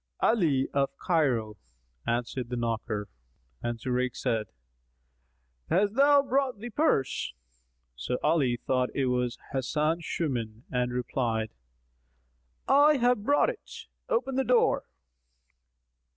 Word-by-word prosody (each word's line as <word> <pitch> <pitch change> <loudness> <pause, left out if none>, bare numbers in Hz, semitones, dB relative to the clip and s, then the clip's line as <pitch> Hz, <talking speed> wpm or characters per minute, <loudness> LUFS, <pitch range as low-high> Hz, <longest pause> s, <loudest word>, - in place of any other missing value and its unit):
"Ali 155 - +2
of 140 -1 +2
Cairo," 125 - 0 0.5
answered 120 +1 -2
the 125 - -2
knocker; 115 -3 -2 0.5
and 120 0 -2
Zurayk 125 +1 -1
said, 115 -5 -1 1.2
"Hast 200 +4 +2
thou 280 +2 +5
brought 270 -3 0
the 235 +4 -7
purse?" 210 - 0 0.6
So 65 - -2
Ali 145 -6 +2
thought 125 +1 0
it 135 - +1
was 125 -1 0 0.2
Hasan 150 +5 0
Shuman 120 -9 -3
and 125 -1 0
replied, 120 -3 -1 1.2
"I 290 +1 +6
have 245 -3 +2
brought 285 - +3
it;[FN#246] 460 - -12 0.2
open 475 - 0
the 265 - +3
door." 250 -1 +3
135 Hz, 110 wpm, -28 LUFS, -, 1.2 s, I